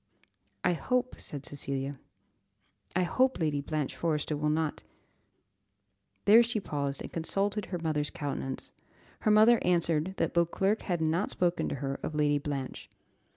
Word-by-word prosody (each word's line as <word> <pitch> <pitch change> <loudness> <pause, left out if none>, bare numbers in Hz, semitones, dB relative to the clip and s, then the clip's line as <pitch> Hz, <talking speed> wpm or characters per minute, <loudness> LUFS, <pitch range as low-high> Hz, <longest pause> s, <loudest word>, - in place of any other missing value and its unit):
"I - - +3
hope," 250 - -1
said 140 -2 -3
Cecilia, 140 -1 -3 1.0
"I 185 - +3
hope 255 +10 +2
Lady 150 -3 0
Blanche 150 -1 -2
Forrester 155 -2 -1
will 150 +1 0
not 155 0 0 0.7
" 100 0 -47
there 220 +3 +8
she 235 -2 0
paused, 140 -6 -3
and - - -8
consulted 200 +5 0
her 180 - -3
mother's 155 -3 -1
countenance; 135 -2 -4 0.5
her - - +1
mother 220 +3 +6
answered 170 0 +1
that - - 0
Beauclerc 190 +5 +2
had 175 -4 -2
not 160 +5 +1
spoken 175 -1 0
to - - -2
her 135 0 -3
of 155 - -4
Lady 145 -1 +2
Blanche. 140 -2 -5
155 Hz, 150 wpm, -30 LUFS, 140-185 Hz, 1.0 s, there